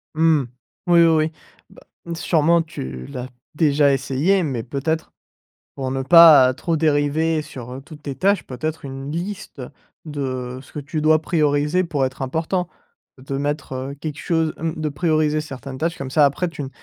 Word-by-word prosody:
Mmh. 160 -2 +3 0.4
Oui, 170 -1 +6
oui, 165 - +6
oui. 160 -1 +2 0.4
Bah, - - -17 0.3
sûrement 170 0 +2
tu 65 - -7
l'as 125 0 -6 0.3
déjà 145 -2 +3
essayé 140 +8 +1
mais 130 -7 -2
peut-être 145 +6 -3 0.6
pour 130 -1 -4
ne 135 0 -2
pas 150 -4 +8
trop 165 +5 -1
dériver 155 +1 +1
sur, 125 -5 -9
heu, 130 - -7
toutes 150 +1 -13
tes 140 - -4
tâches, 195 +7 +1
peut-être 150 +5 -5
une 135 +1 -7
liste 175 -1 -5 0.5
de 130 -4 -4
ce 135 - -19
que - - -6
tu 145 +2 -4
dois 155 0 +4
prioriser 150 +1 +1
pour 145 -5 -1
être 130 +1 -7
important. 160 +6 -1 0.5
De 135 +1 -5
mettre, 145 0 -3
heu, 130 +2 -5
quelque 150 -2 -5
chose, 160 -2 0
mmh 160 -1 -3
de 155 - 0
prioriser 155 0 +1
certaines 135 -2 -8
tâches 165 +3 -2
comme 135 -1 -5
ça 150 +2 +4
après 145 +6 +1
tu 165 -3 -7
ne 135 - -5
150 Hz, 175 wpm, -21 LUFS, 135-160 Hz, 0.6 s, pas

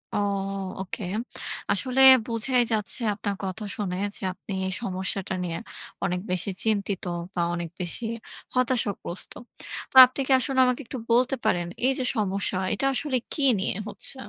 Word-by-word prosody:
ও! - - +2 0.6
ওকে। 190 +2 -5 0.7
আসলে 255 +6 +1 0.3
বোঝাই 240 +2 +2
যাচ্ছে 210 +2 -1
আপনার 205 0 -3
কথা 190 +3 -4
শুনে 185 -4 -2 0.2
যে, - - -10
আপনি 190 +2 -12 0.2
এই 190 - -2
সমস্যাটা 190 -1 -3
নিয়ে 170 -2 -3 0.5
অনেক 180 -1 -1
বেশি 185 +2 -1
চিন্তিত 200 -3 0 0.3
বা 175 - -1
অনেক 170 -1 -4
বেশি 180 +6 -2 0.5
হতাশাগ্রস্ত। 235 -8 -1 0.6
তো - - -20
আপনি 255 +2 -7
কি - - -1
আসলে 265 0 0
আমাকে 250 +2 0
একটু 260 - -6
বলতে 255 +3 +3
পারেন, 175 -1 +1 0.2
এই 265 - +5
যে - - 0
সমস্যা, 200 -3 -1 0.2
এটা 270 - -1
আসলে 270 -2 0 0.2
কী 290 - -1 0.2
নিয়ে 190 - -1
হচ্ছে? 215 - -3
205 Hz, 150 wpm, -26 LUFS, 185-250 Hz, 0.7 s, এই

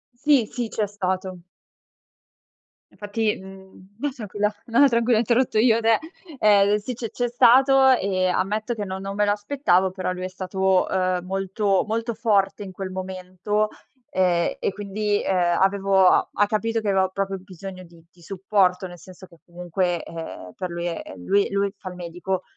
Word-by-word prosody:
Sì, 265 -4 +3
sì, 240 -3 -3
c'è 210 -2 -1
stato. 190 -2 -3 1.5
Infatti, 210 +1 -2
mhmm 190 0 -14
no 290 0 -1
tranquilla, 210 -3 -2
no, 235 +3 +1
no 285 - +8
tranquilla 235 -1 +2
ho - - +3
interrotto 235 0 +1
io 230 -1 +4
te. 225 0 +3 0.4
Ehm, 205 0 +5
sì 230 +4 -5
c'è 230 -2 -5
c'è 245 0 -2
stato 265 +3 +5
e 190 -6 +1
ammetto 210 +6 -1
che 205 -2 -4
non 190 0 -5
non 195 0 -5
me 210 0 +2
l'aspettavo, 205 -3 +1
però 185 -1 -3
lui 180 0 -6
è 185 - -3
stato, 190 0 0
uhm, 185 -1 0
molto 195 +1 0
molto 230 +2 -2
forte 210 -3 +1
in 190 - -8
quel 190 0 -6
momento. 185 +3 -2 0.4
Ehm, 180 -2 +1
e - - -1
quindi, 205 +1 -2
ehm, 175 -2 +1
avevo 195 -1 +3
a - - +3
ha 205 - +2
capito 225 +2 -1
che 210 -2 -2
avevo 190 -1 +2
proprio 195 0 -2
bisogno 185 0 -10
di 170 -1 -17
di 175 - -24
supporto, 185 0 0
nel 175 0 -11
senso 185 +1 -13
che 170 - -20
comunque, 175 0 -2
ehm, 160 - -8
per 185 - -4
lui, 170 0 -4
ehm 95 - -7
lui 200 0 +2
lui 200 0 0
fa 185 - -8
il 180 - -10
medico, 180 +2 -4
195 Hz, 175 wpm, -23 LUFS, 185-215 Hz, 1.5 s, no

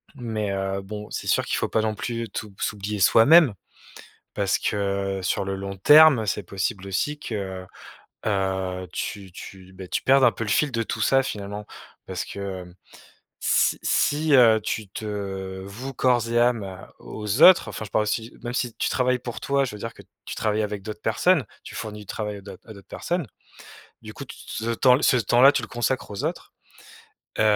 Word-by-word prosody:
Mais 110 -5 -3
heu, 95 0 -2
bon, 105 +2 -8
c'est - - -5
sûr - - +2
qu'il - - -1
faut - - 0
pas 110 - +1
non 110 0 -1
plus 115 +1 -4
t'ou 105 +1 -6
s'oublier 105 0 -3
soi-même 125 - +6 0.8
parce 100 -2 +1
que 100 -2 -1
sur 90 - 0
le 95 0 -2
long 100 0 -6
terme 145 +2 +7
c'est 105 0 -2
possible 100 +2 -3
aussi 145 +10 -2
que, 95 -7 -5 0.6
heu, 95 -2 -1
tu 95 -2 -5
tu, 95 +1 -11
beh, 95 0 -9
tu - - -2
perdes 135 0 +5
un 120 - +6
peu 115 - -5
le 110 - -4
fil 145 +7 +2
de 115 -2 -1
tout 110 0 -4
ça, 135 +5 +4
finalement. 105 -3 -5 0.4
Parce - - -4
que, - - -8 0.2
hem, 90 0 -13 0.7
si - - +2
si, 150 +2 +2
heu, 115 -4 +6
tu 110 -1 -3
te 95 -2 -5
voues 120 +8 -7
corps 120 -2 +2
et 120 - +2
âme, 120 -2 +3
heu, 95 -1 -7 0.2
aux 105 +5 -3
autres, 185 -1 +8
enfin, - - -6
je 105 - -10
parle 105 - +2
aussi, 110 +2 -2
heu, - - -18
même 120 0 -4
si 125 -2 -1
tu - - -1
travailles 125 0 +1
pour 120 -1 -7
toi. 140 0 +1
Je 125 - -5
veux - - -8
dire 115 - -5
que - - -14 0.2
tu - - -6
travailles 110 0 0
avec 105 -1 -4
d'autres 105 +1 -8
personnes, 145 - +2 0.2
tu - - -10
fournis 105 -1 -6
du 105 - -12
travail 105 +2 -4
à - - -9
d'autres 100 +4 -13
à - - -8
d'autres 100 -2 -15
personnes. 175 -3 -3 0.8
Du - - -10
coup, - - -8
tout - - -11
t - - -14 0.2
ce 115 - 0
temps 125 +3 +4
ce 130 - +4
temps-là, 120 +4 +5
tu 135 - -1
le 110 - -7
consacre 120 -1 -2
aux 100 - -5
autres, - - -4 0.9
heu - - +4
105 Hz, 205 wpm, -24 LUFS, 100-120 Hz, 0.9 s, autres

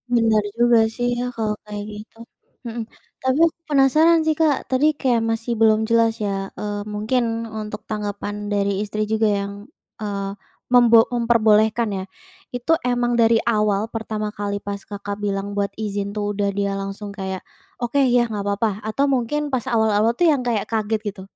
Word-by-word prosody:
Bener 225 -2 +3 0.2
juga 240 -1 +5 0.2
sih 245 0 -1
ya - - -1
kalau 220 -2 -1
kayak 210 -1 -6
gitu, 210 +2 -11 0.5
mhm. 235 0 -4 0.4
Tapi 260 +2 +1
aku 330 - -2
penasaran 305 +4 +5
sih, 315 - +3
Kak, 300 -4 +4
tadi 260 +3 +3 0.2
kayak 245 -4 +2
masih 225 +1 -2
belum 220 -1 +5
jelas 230 -1 +4
ya, 195 -1 -2
eee, 205 -1 -3
mungkin 230 +1 -1 0.2
untuk 210 0 -6
tanggapan 205 -1 -4 0.2
dari 200 0 0
istri 215 +1 -2
juga 220 0 +2
yang, 200 0 -4 0.5
eee, 200 -2 -3 0.4
membo 235 -2 +7
memperbolehkan 225 -1 +3
ya. 190 - -4 0.5
Itu 245 +7 +1
emang 245 -1 0
dari 225 0 +5
awal 210 -3 +2
pertama 215 -1 -3
kali 205 -1 -3
pas, 200 -1 -4
Kakak, 205 0 -5
bilang 200 0 -2
buat 200 0 0
izin 205 -2 -3
tuh 205 -1 -1
udah 200 0 0
dia 200 0 0
langsung 195 +1 -6
kayak, 190 -2 -5 0.4
"oke 240 +4 0
ya 245 -2 +4
nggak 210 -2 -3
apa-apa," 205 +2 +1 0.2
atau 275 +6 +1
mungkin 260 +4 0
pas 250 -3 0
awal-awal 220 0 +3
tuh 350 - +3
yang 280 - +1
kayak 220 -4 0
kaget 220 -1 0
gitu? 200 -2 -5
220 Hz, 170 wpm, -22 LUFS, 205-240 Hz, 0.5 s, membo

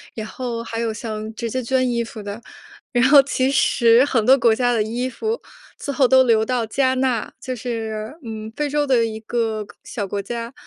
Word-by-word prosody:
然 220 - -4
后 235 -1 -4
还 230 0 -5
有 230 -1 -1
像 215 0 -5
直 230 0 -3
接 255 +3 -2
捐 255 +2 +1
衣 235 -1 0
服 225 -2 -9
的。 205 +3 -6 0.5
然 245 0 +3
后 285 -1 +9
其 265 -1 0
实 235 -3 +4
很 235 -6 +1
多 265 +3 +7
国 230 -3 +4
家 245 0 +1
的 225 - +1
衣 235 +4 -2
服 440 - -3 0.4
最 280 - -4
后 265 -1 +4
都 260 +1 +6
流 225 -3 +3
到 245 -1 0
加 260 +4 +1
纳， 255 -4 -1
就 255 -1 -4
是， 225 -1 -4
嗯， 220 -1 -6
非 295 -1 -1
洲 295 +1 +1
的 245 -4 +3
一 220 -1 -5
个 225 -1 -2
个 - - -17
小 205 -4 -4
国 200 +1 -3
家。 235 +4 -5
235 Hz, 230 characters per minute, -21 LUFS, 220-260 Hz, 0.5 s, 后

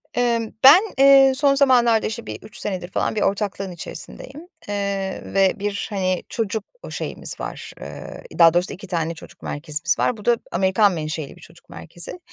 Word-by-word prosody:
Imm, 235 -2 0
ben, 300 +9 +9
eee, 275 -1 +7
son 280 0 +4
zamanlarda 245 -5 +4
işte 230 +2 -6
bir - - -7
3 215 +2 -12
senedir 185 -3 -2
falan - - -1
bir 210 - -1
ortaklığın 195 -1 -1
içerisindeyim, 275 - -9 0.2
eee, 200 -1 -3
ve 195 -1 +2
bir, 200 0 -3
hani, 185 -3 -1
çocuk 220 -2 -2 0.2
o - - -8
şeyimiz - - -5
var, - - -7
eee, - - -9 0.2
daha 165 -1 +7
doğrusu 175 +1 +1
2 200 +3 -10
tane 165 -2 -2
çocuk - - -14
merkezimiz 155 +3 -2
var. 245 - +1
Bu 210 - -12
da 240 -1 +4
Amerikan 190 +3 +3
menşeli 155 -3 -5
bir - - -18
çocuk 165 +1 -18
merkezi. 175 - -5
200 Hz, 175 wpm, -22 LUFS, 180-235 Hz, 0.2 s, ben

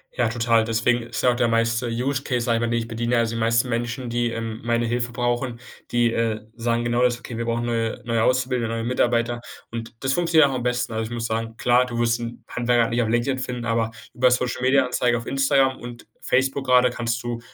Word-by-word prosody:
Ja, 120 -2 +1
total. 115 -1 +2
Deswegen 115 +2 +1
ist 115 -1 -5
ja 125 - +4
auch - - -1
der 120 -1 +2
meiste 115 +1 +1
Use 130 +4 -1
Case, 125 -3 -1
sage 115 -2 +2
ich - - -2
mal, 120 - 0
den 115 0 +1
ich 115 - -5
bediene 120 +1 -1
also 115 -1 0
die - - -2
meisten 115 +2 +2
Menschen, 120 +1 -2
die, 120 0 0
ähm, 115 -1 -5
meine 120 0 +1
Hilfe 120 +1 -1
brauchen, 120 0 -1 0.3
die, 120 -1 +3
äh, 115 -2 0 0.2
sagen 115 0 0
genau 120 +1 +1
das: 120 -1 +2
„Okay, 120 -2 -8
wir 115 - -2
brauchen 115 0 -1
neue 115 -1 -1
neue 115 -1 +1
Auszubildende 125 -2 +1
und 115 - -2
neue 115 - -3
Mitarbeiter.” 120 -1 +1 0.3
Und 115 0 -6
das 135 0 +1
funktioniert 165 -3 +4
auch - - -3
am 125 - -3
besten. 125 -1 -1
Also, 110 0 -1
ich 110 - -6
muss 120 -1 -3
sagen, 115 0 -3
klar, 125 +1 +3
du 120 -2 -4
wirst 120 0 +2
'nen 115 0 -7
Handwerker 120 -1 +1
nicht 120 +1 +1
auf 110 - 0
LinkedIn 120 +3 +1
finden, 125 -2 -4
aber 115 0 0 0.2
über 125 +1 +3
Social-Media-Anzeige 125 0 +2
auf 115 - -7
Instagram 135 -1 +2
und 120 -1 -10
Facebook 135 +1 0
grade 125 -1 +5
kannst 115 -2 -2
du, 120 -1 -3
120 Hz, 235 wpm, -23 LUFS, 115-125 Hz, 0.3 s, grade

